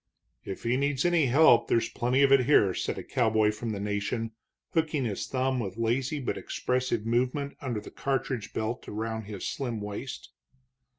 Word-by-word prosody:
"If 95 - -6
he 120 +2 +1
needs 140 0 0
any 170 -5 +3
help 125 -3 +6
there's 115 - +2
plenty 125 +3 +1
of 135 - +4
it 130 -2 +5
here," 100 -10 +5
said - - -2
a - - -5
cowboy 110 -4 +2
from 115 +2 -5
the 100 - -4
Nation, 105 +3 -2 0.4
hooking 155 -5 +1
his 105 -4 -3
thumb 130 0 0
with 100 -3 -4
lazy 125 +6 0
but 130 - -2
expressive 125 -3 -1
movement 125 +5 0
under 120 -5 -2
the - - -11
cartridge 130 -4 -2
belt 110 +3 -3
around 110 +1 -3
his 100 -2 -6
slim 120 -5 -3
waist. 105 +6 -6
120 Hz, 175 wpm, -28 LUFS, 110-135 Hz, 0.4 s, help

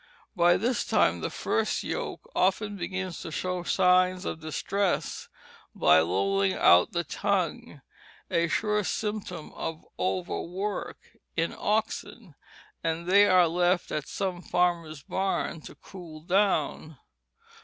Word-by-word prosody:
By 175 -1 +5
this 240 +5 0
time - - +2
the - - -2
first - - -1
yoke - - -4
often 205 +2 +1
begins 185 -1 -4
to - - -6
show 180 +3 -2
signs 180 +1 +3
of - - -4
distress 185 +5 -2 0.5
by 80 +1 +5
lolling 95 +3 +1
out 90 +1 +5
the 170 0 -1
tongue, 175 -5 -2 0.5
a 170 -1 +2
sure 210 +4 0
symptom 205 -5 -4
of 160 0 -5
overwork 185 +2 -3 0.4
in 165 +1 0
oxen, 215 -2 -2 0.5
and 165 +1 -1
they 200 +2 +6
are 185 -2 +5
left 175 +2 +1
at 150 -1 -3
some 185 -3 -3
farmer's 170 -5 0
barn 190 -4 -2
to - - -11
cool 170 -5 -11
down. 170 -4 0
180 Hz, 125 wpm, -27 LUFS, 160-195 Hz, 0.5 s, they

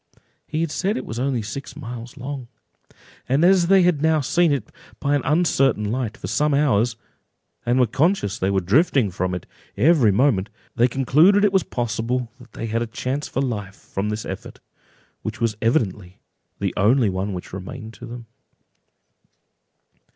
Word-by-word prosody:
He 155 +2 -2
had 165 -2 -1
said 200 +8 -1
it - - -5
was 115 - -5
only 130 -3 0
six 140 +7 -7
miles 120 +2 -8
long; 130 -1 -6 0.8
and 140 +6 +3
as 180 -2 +5
they 190 0 +6
had 175 -5 +2
now 160 0 +3
seen 170 +4 +2
it 135 -7 -2 0.3
by 140 - 0
an 145 - +2
uncertain 135 -9 +2
light 120 -3 -2
for - - -8
some 145 +9 +1
hours, 120 -5 +2 0.7
and 120 +2 +3
were 125 - +5
conscious 125 - 0
they 95 - +1
were 95 -1 +1
drifting 120 - +3
from 90 0 -2
it 90 - -6 0.3
every 130 -2 +5
moment, 100 -3 +2 0.3
they 120 +1 +4
concluded 155 - +4
it 200 - +2
was 190 - +4
possible 120 -1 -2
that 125 0 -16
they - - -5
had 115 +1 -1
a 120 - -1
chance 130 +5 -3
for 135 - -2
life 105 -6 -4
from 100 +1 -4
this 105 +1 -3
effort, - - -7 0.6
which 110 +2 -5
was 115 -2 0
evidently 105 - 0 0.4
the - - -2
only 110 +1 +3
one 95 +2 -2
which 90 -2 -7
remained 100 +4 -7
to - - -10
them. 120 0 -8
125 Hz, 175 wpm, -22 LUFS, 105-145 Hz, 0.8 s, they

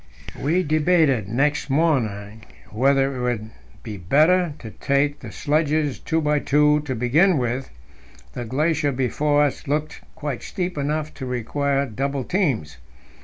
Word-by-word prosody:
We 170 +6 +1
debated 155 - +2
next 145 +6 0
morning 115 -9 0 0.3
whether 135 +4 +2
it 125 - -4
would 125 -3 -1
not 110 - -12 0.3
be 105 -2 -6
better 155 - +3
to 110 -6 -9
take 140 +4 0
the - - -9
sledges 150 -1 0
two 160 - -1
by 150 -1 +1
two 150 +1 +3
to 130 -3 -3
begin 150 - +3
with; 125 +1 -2 0.6
the 125 - -4
glacier 145 +4 0
before 145 +3 +1
us 145 +1 -2
looked 150 +2 -2
quite 145 -5 -4
steep 180 -1 -4
enough 150 +1 -2
to 130 - -7
require 140 +3 -1
double 135 +3 -3
teams. 125 - -1
140 Hz, 145 wpm, -22 LUFS, 125-155 Hz, 0.6 s, better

